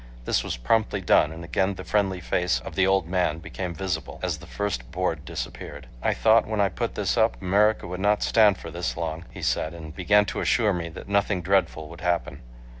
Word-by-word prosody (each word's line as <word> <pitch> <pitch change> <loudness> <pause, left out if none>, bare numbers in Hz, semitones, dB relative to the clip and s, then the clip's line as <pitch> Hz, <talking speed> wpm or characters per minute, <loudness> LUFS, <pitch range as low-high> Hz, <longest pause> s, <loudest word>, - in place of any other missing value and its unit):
This - - +1
was - - -3
promptly 100 - +1
done 80 -4 +3
and 80 +1 -8
again 95 +3 0
the 95 - -8
friendly 95 -3 0
face 90 +1 0
of - - -8
the 95 -1 +3
old 95 -3 +2
man 90 -3 +1
became 90 +2 -5
visible, 90 -5 -4
as 85 -4 -1
the 90 - -12
first 90 -13 -3
board - - -2
disappeared. - - -6 0.2
"I - - +1
thought 110 +1 +4
when 110 -1 -2
I 100 -1 +3
put 85 - -3
this - - 0
up - - +2
America 105 - +2
would 90 +1 -5
not 105 +2 +2
stand 105 -4 +5
for - - -9
this 60 - -3
long," 80 0 -4
he - - -10
said, 80 +2 0
and 80 -2 -9
began 105 +3 +4
to - - -3
assure 110 -4 +2
me 85 -2 -3
that 80 - -10
nothing 100 -2 +1
dreadful 95 -4 +1
would 85 +1 -11
happen. 90 -1 -1
90 Hz, 215 wpm, -25 LUFS, 85-100 Hz, 0.2 s, stand